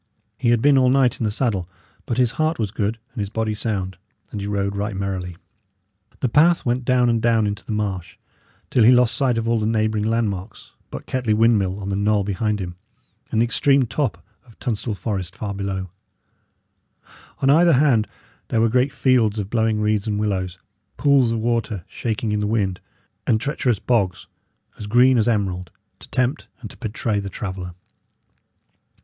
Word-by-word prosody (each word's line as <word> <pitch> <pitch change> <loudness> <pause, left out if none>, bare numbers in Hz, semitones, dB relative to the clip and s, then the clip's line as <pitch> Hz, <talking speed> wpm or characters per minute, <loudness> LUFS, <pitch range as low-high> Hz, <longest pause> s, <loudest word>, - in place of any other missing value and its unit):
He 120 +2 0
had 120 -1 +2
been 140 -1 +5
all 130 -1 +4
night 130 -1 +3
in 115 - 0
the - - +1
saddle, 105 -6 -1 0.4
but 120 - -2
his 125 -2 +3
heart 155 +3 0
was 105 -4 -2
good 110 0 -1 0.2
and 125 - -7
his 100 -1 -2
body 110 0 -1
sound, 95 -4 -3 0.3
and 105 - -5
he 100 - -4
rode 100 -1 -1
right 100 +1 -3
merrily. 95 -2 -3 0.9
The - - +2
path 160 +8 +4
went 125 0 0
down 125 -1 +3
and 115 -1 +1
down 115 -2 +3
into 105 0 -3
the - - -7
marsh, 95 -5 -3 0.5
till 120 - +4
he 115 - +7
lost 125 -2 +4
sight 130 -4 +1
of 115 0 -1
all 115 -1 +2
the 105 - 0
neighbouring 110 -1 0
landmarks 110 -3 -2 0.2
but - - -8
Kettley 125 -5 0
windmill 105 -4 +2
on 100 -1 -5
the 100 - -1
knoll 100 0 +2
behind 105 +2 -1
him, 90 -2 -6 0.5
and 110 - +1
the - - +4
extreme 135 +2 +3
top 115 - -2 0.2
of 115 - -19
Tunstall 110 -2 -3
Forest 95 -4 -4
far 100 -2 -4
before. 95 -2 -4 1.5
On 135 - +5
either 170 +3 +5
hand 125 -6 +3 0.4
there 115 - 0
were 115 0 +3
great 125 +4 +2
fields 120 -6 +2
of 100 -1 -4
blowing 110 -2 +1
reeds 105 0 0
and 105 -1 -1
willows, 95 -4 -2 0.4
pools 140 -5 +4
of 115 - 0
water 110 -5 -1
shaking 110 -1 -3
in 105 - 0
the 105 - -1
wind, 100 -4 0 0.5
and 110 - +3
treacherous 125 -3 0
bogs, 95 -6 0 0.5
as 105 - -6
green 125 +3 +5
as 110 - +1
emerald, 95 -6 -1 0.3
to - - -14
tempt 130 +4 -1
and 110 -5 -9
to - - -15
betray 110 -2 -2
the 100 -1 -5
traveller. 95 -3 -6
110 Hz, 185 wpm, -22 LUFS, 100-120 Hz, 1.5 s, he